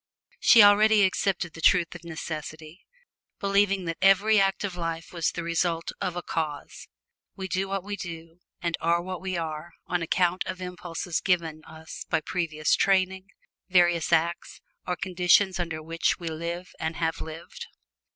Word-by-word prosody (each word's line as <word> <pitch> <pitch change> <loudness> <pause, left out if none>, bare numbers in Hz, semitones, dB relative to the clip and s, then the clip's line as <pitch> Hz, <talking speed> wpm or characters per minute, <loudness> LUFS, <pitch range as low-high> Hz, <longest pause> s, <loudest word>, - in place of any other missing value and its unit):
She 230 -4 +8
already 210 +1 +6
accepted 190 -2 0
the 165 - -10
truth 175 -1 +4
of 175 -1 -11
necessity, 155 +1 -7 0.5
believing 200 -1 +2
that 165 -1 -4
every 200 +3 +5
act 195 +1 +1
of 195 -3 -3
life 165 -1 -5
was 170 -2 0
the 170 - -5
result 165 0 -1
of 180 - -2
a 175 - -4
cause. 150 -3 -4 0.5
We 190 -1 -5
do 190 +1 -1
what 195 -1 -3
we 205 +1 -4
do, 165 -2 -8 0.2
and 170 -1 0
are 170 +1 +2
what 185 0 -6
we 185 -1 -3
are, 160 +1 -5
on 180 0 -1
account 180 +2 +1
of 185 -1 -5
impulses 180 -2 -4
given 165 -4 0
us 160 0 -10
by 160 - +2
previous 155 -3 0
training, 190 0 +1 0.4
previous 175 -3 +3
acts 170 +1 0 0.3
or 180 - 0
conditions 185 +1 +2
under 165 -3 -3
which 165 +1 0
we 170 -2 -5
live 170 +2 -5
and 160 +1 -2
have 160 -1 -2
lived. 160 +1 -8
175 Hz, 160 wpm, -26 LUFS, 165-190 Hz, 0.5 s, She